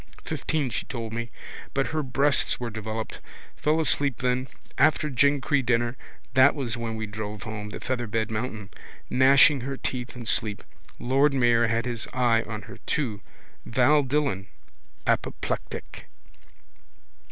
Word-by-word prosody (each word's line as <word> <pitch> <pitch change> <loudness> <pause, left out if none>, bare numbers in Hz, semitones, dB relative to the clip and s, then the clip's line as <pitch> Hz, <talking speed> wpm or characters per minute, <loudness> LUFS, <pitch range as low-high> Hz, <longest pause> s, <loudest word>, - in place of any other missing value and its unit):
Fifteen 145 -6 -1
she - - -2
told 115 -3 -5
me. 115 +1 -3 0.5
But 135 0 +1
her 155 -1 -1
breasts 140 +1 +2
were 120 -2 -4
developed. 110 0 -5 0.4
Fell 155 +2 +1
asleep 145 -4 +2
then. 125 0 0 0.3
After 150 -1 +3
Glencree 140 +2 +2
dinner 120 0 +1 0.4
that 130 +2 +6
was 125 -5 -2
when 115 -1 -4
we 110 0 -3
drove 105 -1 -6
home. 105 -1 -5
Featherbed 115 -1 -2
mountain. 110 -2 -4 0.4
Gnashing 135 +2 +6
her 135 +2 -4
teeth 125 -1 -4
in 120 -1 -7
sleep. 105 -2 0 0.3
Lord 135 +3 +2
mayor 120 -2 +4
had 115 +1 0
his 120 -3 -3
eye 120 -3 +3
on 110 -3 -5
her - - -11
too. 115 -9 -1 0.4
Val 130 +5 +4
Dillon. 135 -8 -1 0.6
Apoplectic. - - -3
125 Hz, 135 wpm, -26 LUFS, 110-135 Hz, 0.6 s, that